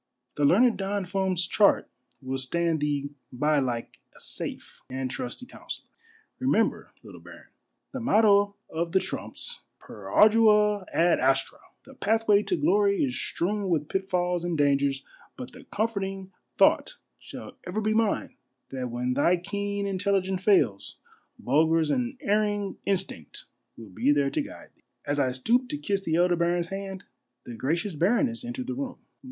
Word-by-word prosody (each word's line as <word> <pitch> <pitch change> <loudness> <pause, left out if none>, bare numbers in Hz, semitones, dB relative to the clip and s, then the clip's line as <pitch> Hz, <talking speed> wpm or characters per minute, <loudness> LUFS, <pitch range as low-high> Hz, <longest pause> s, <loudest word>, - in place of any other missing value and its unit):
The 145 - +1
learned 225 - +4
Don 195 0 -2
Fum's 185 -1 0
chart 205 -2 +3 0.4
will 130 +1 -3
stand 165 +5 0
thee 145 -1 -1 0.2
by 150 +4 +1
like 120 -3 -3 0.2
a - - -16
safe - - -5
and 130 0 -3
trusty 125 - -6
counsellor. 250 - -9 0.5
Remember, 255 -4 +1
little - - -12
baron, - - -14 0.4
the 265 - -5
motto 205 -3 +4
of 165 +1 -3
the 190 - +5
Trumps, 480 - -5 0.2
Per - - -12
Ardua 210 -2 +4
ad 170 +1 +3
Astra 135 +1 +1
— - - -48
the - - -14
pathway 215 -1 +2
to 360 - -1
glory 400 +2 +2
is 255 -3 -1
strewn 200 +2 -2
with 155 -4 0
pitfalls 180 -2 -1
and 175 -2 -2
dangers 140 -1 +1
— - - -27
but 255 -2 -7
the - - -13
comforting 195 -3 -3 0.3
thought - - +3 0.2
shall - - -10 0.2
ever 185 +4 -2
be 215 0 0
mine, 225 -1 0 0.4
that 130 -2 -4
when 125 +1 -2
thy 170 +7 +3
keen 200 +2 -3
intelligence 190 -1 -1
fails, 180 - +2 0.4
Bulger's 160 +3 +2
unerr 240 - 0
ing 205 -2 -3
instinct 185 - -2 0.3
will 115 -3 -11
be 120 +9 +1
there 140 -1 +2
to - - 0
guide - - -10
thee." - - -33 0.2
As 145 0 -1
I 130 - +2
stooped 240 - +1
to 295 - -3
kiss 200 -9 -1
the 165 -4 -1
elder 175 +1 +3
baron's 170 0 0
hand, 195 0 -6 0.4
the 120 - -8
graeious 165 - -1
baroness 235 - +1
entered 245 +1 -5
the 260 - -3
room. 260 -1 -5
190 Hz, 160 wpm, -27 LUFS, 150-215 Hz, 0.5 s, the